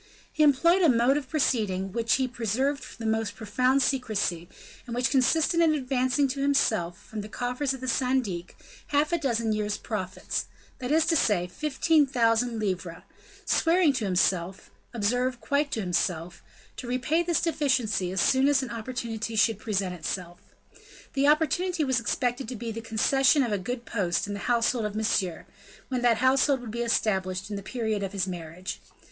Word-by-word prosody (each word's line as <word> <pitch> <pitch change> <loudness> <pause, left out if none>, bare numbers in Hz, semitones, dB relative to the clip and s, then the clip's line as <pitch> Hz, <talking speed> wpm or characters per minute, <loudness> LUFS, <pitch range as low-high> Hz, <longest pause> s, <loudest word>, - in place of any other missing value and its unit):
He - - -1
employed 320 +6 +4
a 335 - +5
mode 245 +2 +3
of 280 -3 -3
proceeding, 220 -11 0
upon 195 - -6
which 230 0 +2
he 260 -1 0
preserved 250 +4 -2
the 225 - -7
most 220 -2 -1
profound 255 +6 +1
secrecy, 210 - -1 0.4
and 235 - -5
which 245 +1 +1
consisted 305 +5 +2
in 320 -2 +4
advancing 260 0 +1
to 275 +1 -3
himself, 220 -11 +1
from 220 -1 -6
the 210 - -9
coffers 250 +4 -2
of 260 - -12
the 260 - -5
syndic, 245 -8 -1 0.3
half 300 +3 +1
a 340 - +2
dozen 230 -6 0
year's 210 -1 -1
profits, 190 -5 -4 0.3
that 255 +1 -4
is 320 +1 +4
to 330 0 +2
say, 205 - +2
fifteen 300 - +1
thousand 235 -2 +1
livres, 185 -5 -3 0.4
swearing 330 -2 +3
to 240 -5 -2
himself 185 -1 0 0.2
observe, 245 +3 0
quite 285 +6 0
to 220 - -1
himself 175 -2 -2 0.4
to 250 - -7
repay 255 +7 +1
this 345 -1 +1
deficiency 255 - 0
as 190 - -2
soon 265 +8 +3
as 280 -2 +3
an 245 - -6
opportunity 230 -1 -4
should 215 0 +2
present 195 -4 -2
itself. 175 +1 -5 0.7
The 275 +1 +2
opportunity 320 +3 +2
was 260 -4 +1
expected 245 +2 -1
to 255 - -5
be 230 +1 -5
the 230 +1 -6
concession 270 +6 +3
of 235 - -2
a 205 - 0
good 240 +5 -5
post 180 -6 -1
in 205 - -5
the 200 - -5
household 235 -1 +2
of 210 0 -4
Monsieur, 200 -6 -1 0.4
when 255 -2 -1
that 240 -2 +3
household 265 +2 +3
would 235 -3 -7
be 235 +2 -3
established 190 -4 -1
at - - -3
the 200 - -5
period 220 -1 -2
of 195 0 -4
his 190 -2 0
marriage. 180 0 -6
235 Hz, 180 wpm, -27 LUFS, 205-270 Hz, 0.7 s, a